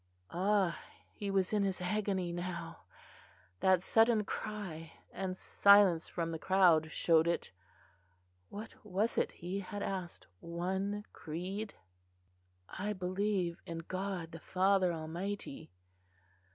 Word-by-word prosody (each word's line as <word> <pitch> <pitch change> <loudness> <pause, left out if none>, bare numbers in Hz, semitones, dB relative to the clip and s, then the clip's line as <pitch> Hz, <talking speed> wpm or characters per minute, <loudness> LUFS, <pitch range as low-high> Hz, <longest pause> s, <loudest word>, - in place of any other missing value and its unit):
Ah! 190 0 +1 0.3
he 205 - -4
was 195 0 +1
in 210 - +3
his 195 -1 0
agony 190 -1 -1
now! 175 0 -5 0.7
that 185 -1 +4
sudden 225 0 +4
cry 190 -7 -5 0.2
and 185 -1 -3
silence 200 -6 +5
from 165 -1 -2
the 160 - -4
crowd 175 -5 +4
showed 165 -1 +4
it. 170 - 0 1.0
What 215 +2 -7
was 210 +2 0
it - - +1
he 180 +3 -4
had 200 +1 -5
asked? 185 -3 -4
one 190 +5 -2
creed? 185 +7 -5 0.9
"I 205 +2 -3
believe 185 -1 -1
in 165 - -4
God 185 -3 -3
the 165 - -8
Father 190 +1 +2
Almighty." 170 - -5
185 Hz, 115 wpm, -34 LUFS, 170-200 Hz, 1.0 s, silence